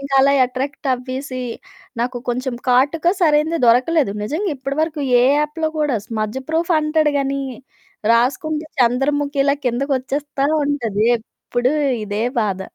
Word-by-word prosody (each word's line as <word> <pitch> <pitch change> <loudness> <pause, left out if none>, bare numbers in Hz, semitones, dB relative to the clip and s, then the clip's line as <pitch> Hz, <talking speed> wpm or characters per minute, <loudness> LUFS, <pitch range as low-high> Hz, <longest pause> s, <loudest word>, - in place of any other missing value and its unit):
ఇంకలా 275 0 +3
ఎట్రాక్టవ్వేసీ, 255 0 -3 0.6
నాకు 245 +1 -1
కొంచం 255 +1 -2
కాటుక 280 +7 +2
సరైనది 315 0 +3
దొరకలేదు. 255 +1 +3
నిజంగా 340 - -2
ఇప్పడవరకు 295 +4 -2 0.2
ఏ - - +4 0.2
యాప్‌లో 300 +2 -1
గూడా 295 -6 +1
స్మజ్ 215 +1 -3
ప్రూఫ్ 330 +2 0
అంటాడు 305 -1 +1
గానీ, 275 0 -1 0.7
రాసుకుంటే 300 +6 +1
చంద్రముఖిలా 280 +3 +2
కిందకొచ్చేస్తా 275 +2 -1 0.2
ఉంటది. 230 -8 0
ఎప్పుడు 245 +2 -3 0.3
ఇదే 210 +1 -2 0.2
బాధ. 195 -3 -1
275 Hz, 110 wpm, -19 LUFS, 250-300 Hz, 0.7 s, ఏ